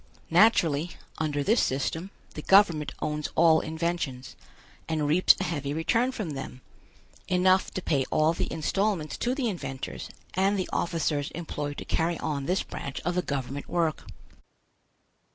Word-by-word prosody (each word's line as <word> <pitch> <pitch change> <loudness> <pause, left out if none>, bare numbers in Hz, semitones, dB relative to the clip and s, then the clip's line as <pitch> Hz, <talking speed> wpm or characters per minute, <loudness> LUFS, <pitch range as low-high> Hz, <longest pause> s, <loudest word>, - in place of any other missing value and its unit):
Naturally, 170 -5 +4 0.3
under 145 -2 0
this 225 +10 +3
system, 160 +7 -1 0.2
the 150 - -6
government 170 -5 +4
owns 150 0 -2
all 160 -1 +6
inventions, 160 -5 -3 0.5
and 155 -2 0
reaps 160 +5 +5
a - - 0
heavy 145 -5 -2
return 230 +10 +1
from 210 -10 -4
them, 135 -2 -7 0.7
enough 185 +1 +3
to 185 - -3
pay 140 -3 +1
all 155 +1 +3
the - - -3
installments 175 0 -1
to 245 +2 0
the 265 -4 -1
inventors 135 - -5 0.2
and 195 +2 +2
the 185 - -1
officers 155 -4 0
employed 150 -3 -4
to - - -6
carry 165 +1 0
on 140 -3 -3
this 180 +2 +1
branch 140 - -6
of 175 - -1
the 180 - +1
government 140 -2 -4
work. 165 -3 0
160 Hz, 150 wpm, -27 LUFS, 145-185 Hz, 0.7 s, all